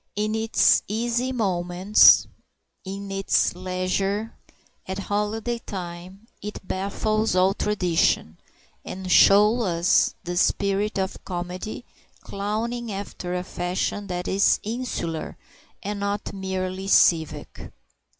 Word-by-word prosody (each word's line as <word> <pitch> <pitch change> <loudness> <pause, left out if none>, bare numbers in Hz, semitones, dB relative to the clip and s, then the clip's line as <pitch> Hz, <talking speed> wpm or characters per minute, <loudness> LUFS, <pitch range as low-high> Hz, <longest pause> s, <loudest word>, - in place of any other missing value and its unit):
In 215 +1 -1
its 220 0 +3
easy 240 +4 -1
moments, 185 -3 +4 0.6
in 195 +1 -7
its 195 0 +1
leisure, 185 +4 -2 0.5
at 190 0 -4
holiday 210 +4 -2
time, 185 0 -8 0.2
it 210 +1 -6
baffles 215 +2 -1
all 185 +1 +4
tradition, 180 - 0 0.4
and 185 0 -6
shows 210 +6 +6
us 175 -2 +2
the 175 0 -4
spirit 200 +2 +1
of 190 0 -3
comedy 180 +6 -5 0.4
clowning 220 +4 -3
after 195 -2 -5
a 180 - -2
fashion 185 +3 -3
that 180 -1 -4
is 195 +1 +3
insular 215 -8 -4 0.5
and 205 +1 -4
not 200 0 -3
merely 190 0 -4
civic. 165 -5 +2
195 Hz, 105 wpm, -24 LUFS, 185-210 Hz, 0.6 s, shows